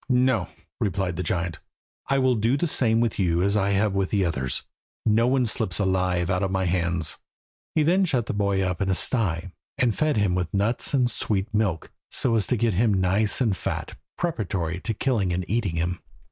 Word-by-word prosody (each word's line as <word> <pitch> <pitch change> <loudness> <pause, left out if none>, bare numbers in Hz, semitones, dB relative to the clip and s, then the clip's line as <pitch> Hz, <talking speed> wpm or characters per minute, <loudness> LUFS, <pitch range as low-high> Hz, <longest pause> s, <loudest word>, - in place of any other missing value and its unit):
"No," 125 -1 +2 0.3
replied 95 -3 -1
the 90 - -3
giant, 85 -1 -2 0.5
"I 135 - +2
will 130 -1 +3
do 115 +4 +1
the 175 - 0
same 115 -7 +2
with 115 -3 -1
you 85 -2 +2
as 100 +1 +2 0.4
with 95 -1 0
the 100 -3 +1
others. 65 -7 -2 0.4
No 115 +2 +3
one 130 -1 +2
slips 100 -5 0
alive 95 -3 +1
out 90 0 0
of 95 - 0
my 95 0 0
hands." 85 -1 0 0.6
He 155 - +3
then 185 +5 +3
shut 130 -9 0
the - - -3
boy 100 -2 +1
up 90 -1 -2
in 95 - 0
a 95 - +2
sty, 95 -6 +1 0.3
and 120 -4 +2
fed 155 -5 +1
him 100 -3 +2
with 90 -3 -1
nuts 110 +7 +1
and 125 -2 +3
sweet 105 -3 -2
milk, 100 -7 -1 0.2
so 125 - +1
as 110 -3 +2
to 125 - +1
get 115 0 +1
him 105 +2 +2
nice 95 +5 +2
and 110 -6 +2
fat - - -4 0.2
preparatory 95 - -2
to 110 +4 -3
killing 105 -7 0
and 90 +1 -2
eating 105 -5 -1
him. 85 +2 -1
100 Hz, 200 wpm, -25 LUFS, 90-120 Hz, 0.6 s, will